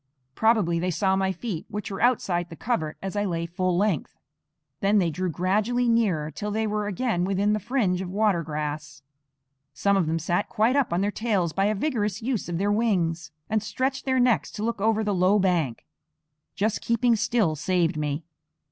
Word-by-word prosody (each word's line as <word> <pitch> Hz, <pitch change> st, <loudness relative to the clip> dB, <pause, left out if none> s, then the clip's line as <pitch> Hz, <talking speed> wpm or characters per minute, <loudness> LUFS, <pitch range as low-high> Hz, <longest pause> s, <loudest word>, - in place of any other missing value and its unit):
Probably 210 Hz, -, +2 dB
they 180 Hz, +2 st, -1 dB
saw 190 Hz, +2 st, +1 dB
my 190 Hz, 0 st, +1 dB
feet, 185 Hz, -2 st, -5 dB
which 210 Hz, +1 st, -5 dB
were 195 Hz, -, -5 dB
outside 185 Hz, -8 st, +1 dB
the 165 Hz, -, -9 dB
covert 160 Hz, -8 st, -2 dB
as 195 Hz, +1 st, -4 dB
I 205 Hz, -, +1 dB
lay 170 Hz, -4 st, -2 dB
full 175 Hz, +1 st, -1 dB
length. 195 Hz, -6 st, 0 dB, 0.6 s
Then 200 Hz, +2 st, +3 dB
they 175 Hz, -4 st, +2 dB
drew 185 Hz, +4 st, -2 dB
gradually 210 Hz, +8 st, +1 dB
nearer 195 Hz, -10 st, +1 dB
till 205 Hz, +8 st, -5 dB
they 220 Hz, +1 st, -1 dB
were 210 Hz, -1 st, -1 dB
again 205 Hz, -2 st, -1 dB
within 195 Hz, +2 st, +1 dB
the 215 Hz, -, 0 dB
fringe 205 Hz, -6 st, 0 dB
of 185 Hz, -, -5 dB
water 200 Hz, -2 st, +2 dB
grass. 150 Hz, -2 st, -5 dB, 0.7 s
Some 200 Hz, +6 st, +2 dB
of 185 Hz, -5 st, +1 dB
them 160 Hz, +1 st, 0 dB
sat 175 Hz, +5 st, -1 dB
quite 225 Hz, +5 st, +2 dB
up 280 Hz, -8 st, +2 dB
on 175 Hz, +2 st, +1 dB
their 205 Hz, +1 st, +1 dB
tails 200 Hz, -8 st, 0 dB
by 195 Hz, +4 st, +1 dB
a 215 Hz, +1 st, +1 dB
vigorous 210 Hz, -5 st, -1 dB
use 235 Hz, -5 st, -2 dB
of 170 Hz, -, -2 dB
their 200 Hz, +3 st, +1 dB
wings, 175 Hz, -8 st, 0 dB, 0.2 s
and 215 Hz, 0 st, 0 dB
stretched 255 Hz, +6 st, -2 dB
their 260 Hz, -1 st, +2 dB
necks 245 Hz, -2 st, +2 dB
to 210 Hz, -, -5 dB
look 230 Hz, -3 st, -2 dB
over 220 Hz, +1 st, +2 dB
the 205 Hz, -1 st, 0 dB
low 185 Hz, +2 st, +3 dB
bank. 175 Hz, -, 0 dB, 0.7 s
Just 215 Hz, +2 st, 0 dB
keeping 235 Hz, +1 st, +2 dB
still 220 Hz, -7 st, +1 dB
saved 175 Hz, +2 st, +1 dB
me. 150 Hz, +1 st, -2 dB
195 Hz, 195 wpm, -25 LUFS, 175-220 Hz, 0.7 s, Then